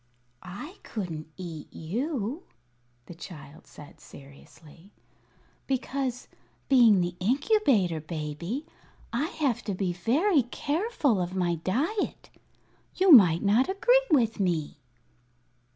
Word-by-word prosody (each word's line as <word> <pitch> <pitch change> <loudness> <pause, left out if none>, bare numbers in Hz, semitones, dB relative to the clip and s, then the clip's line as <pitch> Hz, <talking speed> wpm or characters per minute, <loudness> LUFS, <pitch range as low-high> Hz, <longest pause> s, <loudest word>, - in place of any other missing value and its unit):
"I 250 - -9
couldn't 165 -8 -6
eat 170 -5 -8
you," 245 - -3 0.6
the 175 - -10
child 160 -2 -12
said, 145 - -14
seriously, 150 +5 -16 0.8
"because, 265 -1 -3 0.4
being 235 -8 +5
the 175 0 -2
Incubator 245 - +2
Baby, 165 - -5 0.5
I 270 +7 0
have 280 - -1
to 200 -4 -2
be 185 -2 -1
very 280 - +2
careful 285 - -1
of 180 +1 -4
my 175 -2 +1
diet. 265 - -2 0.6
You 375 0 +4
might 180 - +7
not 220 - +3
agree - - +3
with 235 -9 +2
me." 165 -6 -1
210 Hz, 105 wpm, -27 LUFS, 175-280 Hz, 0.8 s, might